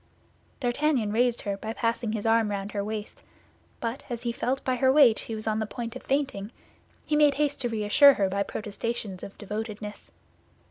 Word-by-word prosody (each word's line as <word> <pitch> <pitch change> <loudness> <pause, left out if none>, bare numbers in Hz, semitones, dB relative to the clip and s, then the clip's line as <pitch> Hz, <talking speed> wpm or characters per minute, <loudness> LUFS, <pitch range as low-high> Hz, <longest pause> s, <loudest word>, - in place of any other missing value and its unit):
D'Artagnan 245 -3 +1
raised 240 +2 +2
her 200 -2 -2
by 220 +2 -5
passing 230 -1 -1
his 215 -1 -3
arm 225 -1 +3
round 200 0 -3
her 200 -1 -2
waist; 215 0 -5 0.6
but 235 +3 -3
as 240 -1 -4
he 235 - 0
felt 255 +3 -2
by 255 -1 0
her 260 +1 +4
weight 265 -6 +6
she 225 - -5
was 215 - -6
on 220 -1 0
the 220 - -2
point 235 0 -6
of 260 - -7
fainting, 265 -7 -1 0.5
he 305 - 0
made 295 -2 +5
haste 290 -1 0
to 240 - 0
reassure 230 +6 +6
her 195 - +2
by 200 +1 -1
protestations 210 -1 -4
of 200 - -9
devotedness. 210 0 -6
230 Hz, 190 wpm, -27 LUFS, 210-255 Hz, 0.6 s, weight